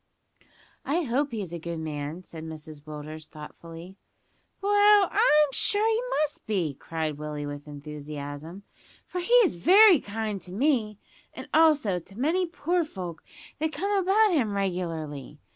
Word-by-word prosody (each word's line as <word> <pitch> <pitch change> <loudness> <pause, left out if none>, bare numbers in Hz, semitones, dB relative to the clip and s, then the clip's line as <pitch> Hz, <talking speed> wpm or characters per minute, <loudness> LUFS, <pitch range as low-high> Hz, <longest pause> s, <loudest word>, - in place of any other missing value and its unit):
"I 325 +6 0
hope 275 +2 0
he's 200 -7 -5
a 170 - -4
good 170 +1 -5
man," 155 +2 -5
said 160 -3 -10
Mrs 155 -2 -9
Willders 155 +1 -8
thoughtfully. 165 +4 -11 0.6
"Well, 410 0 +5
I'm 300 -9 +5
sure 420 +9 +1
he 450 +1 +2 0.2
must 300 0 -4
be!" 180 -9 0
cried 155 +1 -4
Willie 150 -1 -5
with 145 0 -7
enthusiasm, 150 +3 -8 0.4
"for 365 - -5
he 410 +7 -1
is - - 0
very 370 - +7
kind 210 -2 -4
to 180 - -10
me, 225 -3 +1 0.4
and - - -8
also 295 - +4
to 195 +4 -16
many 345 +7 +1
poor 345 +1 0
folk 180 - -7 0.4
that 315 +1 -1
come 400 +2 -2
about 400 +3 +3
him 245 - +1
regularly. 165 -7 -3
195 Hz, 145 wpm, -27 LUFS, -, 0.6 s, very